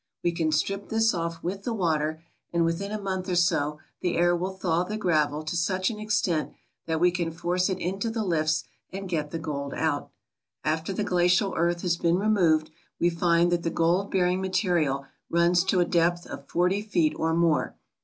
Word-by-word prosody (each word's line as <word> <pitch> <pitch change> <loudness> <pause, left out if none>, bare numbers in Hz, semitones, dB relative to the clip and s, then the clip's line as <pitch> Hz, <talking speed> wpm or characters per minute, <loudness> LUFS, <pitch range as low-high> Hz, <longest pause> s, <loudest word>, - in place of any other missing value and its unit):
We 175 - +2
can 165 -2 0
strip 195 +6 -1
this 225 0 +2
off 165 -1 -3
with 190 +3 -3
the 230 +2 -3
water, 160 -4 0 0.3
and 170 -1 +2
within 175 +5 -2
a 215 - -3
month 190 -1 -3
or 180 - 0
so 150 -4 +2 0.2
the 180 -2 0
air 175 +1 +4
will 185 +2 -3
thaw 175 -2 +1
the 210 +4 -4
gravel 155 -6 +1
to 155 +3 -4
such 185 +4 0
an 210 - -7
extent 205 -7 0 0.3
that 160 -1 0
we 180 +1 +4
can 175 -2 -1
force 175 +3 0
it 190 - -1
into 195 +5 -2
the 225 -1 -2
lifts 155 -4 +1 0.3
and 195 +1 -5
get 155 -4 -2
the 165 - -4
gold 140 -3 -4
out. - - -1 0.5
After 160 +4 -1
the 200 +2 -1
glacial 180 +1 +2
earth 170 +1 0
has 175 -2 +1
been 170 +1 +2
removed 175 -7 +2 0.3
we 175 - +3
find 170 0 +2
that 175 -1 +1
the 170 - -1
gold 170 +4 +1
bearing 180 0 +1
material 175 -7 0 0.2
runs 170 +1 +3
to 190 -1 +2
a - - +3
depth 175 0 +1
of 140 - -9
forty 180 +4 +1
feet 175 -7 +1
or 160 0 +1
more. 170 -2 +1
175 Hz, 200 wpm, -26 LUFS, 165-190 Hz, 0.5 s, air